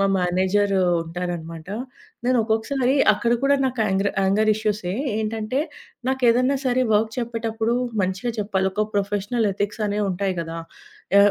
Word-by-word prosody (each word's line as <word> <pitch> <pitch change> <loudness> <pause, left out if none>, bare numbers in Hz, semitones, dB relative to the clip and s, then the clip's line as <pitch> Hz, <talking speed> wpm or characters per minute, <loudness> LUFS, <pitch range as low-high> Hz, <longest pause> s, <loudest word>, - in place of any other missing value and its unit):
మా 195 - +4
మేనేజరు 190 +2 +2 0.2
ఉంటారనమాట. 165 -1 -5 0.6
నేను 255 0 +3
ఒక్కొక్కసారి 245 +4 +1 0.2
అక్కడ 235 +3 0
కూడా 280 +1 +4
నాకు 255 -3 -1
ఆంగ్రా 195 0 +1
ఆంగర్ 215 +3 +3
ఇష్యూసే. 210 -4 -2 0.2
ఏంటంటే 220 +3 -2 0.5
నాకేదన్నా 255 +1 +3
సరే, 255 +1 +2
వర్క్ 220 +1 +2
చెప్పేటప్పుడు 230 -1 -1 0.3
మంచిగా 190 +6 -1
చెప్పాలి, 195 -2 0
ఒక 215 +2 +1
ప్రొఫెషనల్ 205 +2 0
ఎథిక్సనేవుంటాయి 205 -2 -1
కదా! 165 0 -5 0.6
ఆహ్, 205 0 +6
210 Hz, 120 wpm, -23 LUFS, 190-235 Hz, 0.6 s, ఆహ్